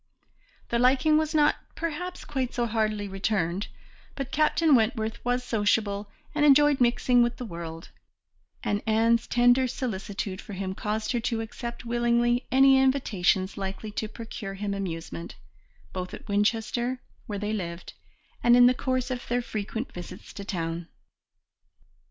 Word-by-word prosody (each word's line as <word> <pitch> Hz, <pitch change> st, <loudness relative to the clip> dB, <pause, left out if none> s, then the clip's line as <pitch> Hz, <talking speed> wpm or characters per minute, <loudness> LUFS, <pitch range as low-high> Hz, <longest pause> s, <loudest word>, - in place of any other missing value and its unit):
The 235 Hz, -, +1 dB
liking 270 Hz, +5 st, +4 dB
was 315 Hz, 0 st, -1 dB
not, 295 Hz, -1 st, +4 dB, 0.2 s
perhaps, 335 Hz, +3 st, -4 dB
quite 265 Hz, -5 st, -3 dB
so 240 Hz, -, +1 dB
heartily 215 Hz, -2 st, -1 dB
returned, 195 Hz, -1 st, -1 dB, 0.5 s
but 275 Hz, -1 st, -5 dB
Captain 310 Hz, +1 st, +3 dB
Wentworth 225 Hz, -1 st, +1 dB
was 245 Hz, +1 st, 0 dB
sociable 205 Hz, -3 st, 0 dB, 0.2 s
and 295 Hz, -1 st, +1 dB
enjoyed 290 Hz, -1 st, +6 dB
mixing 245 Hz, 0 st, +4 dB
with 240 Hz, 0 st, +1 dB
the 250 Hz, -, -5 dB
world, 170 Hz, -4 st, -7 dB, 0.7 s
and 205 Hz, 0 st, 0 dB
Anne's 230 Hz, +1 st, +3 dB
tender 245 Hz, +2 st, +4 dB
solicitude 200 Hz, -5 st, -4 dB
for 205 Hz, -, -9 dB
him 190 Hz, 0 st, -3 dB
caused 215 Hz, +2 st, -2 dB
her 240 Hz, -, +1 dB
to 230 Hz, -1 st, -1 dB
accept 235 Hz, +2 st, -6 dB
willingly 240 Hz, +1 st, +1 dB
any 270 Hz, 0 st, +6 dB
invitations 200 Hz, -8 st, +1 dB
likely 195 Hz, +2 st, -4 dB
to 215 Hz, +1 st, -3 dB
procure 215 Hz, -3 st, -7 dB
him 200 Hz, 0 st, -3 dB
amusement, 165 Hz, -, -5 dB, 0.6 s
both 185 Hz, -1 st, -4 dB
at -, -, -13 dB
Winchester, 225 Hz, +4 st, 0 dB, 0.3 s
where 205 Hz, -3 st, -3 dB
they 210 Hz, +2 st, -2 dB
lived, 170 Hz, -4 st, -5 dB, 0.5 s
and 240 Hz, 0 st, +6 dB
in 245 Hz, -, +8 dB
the 250 Hz, -, +6 dB
course 255 Hz, 0 st, -1 dB
of 245 Hz, -1 st, -4 dB
their 245 Hz, 0 st, 0 dB
frequent 220 Hz, +3 st, -4 dB
visits 175 Hz, 0 st, -9 dB
to 200 Hz, -, -7 dB
town. 170 Hz, -3 st, -3 dB
230 Hz, 145 wpm, -27 LUFS, 200-250 Hz, 0.7 s, in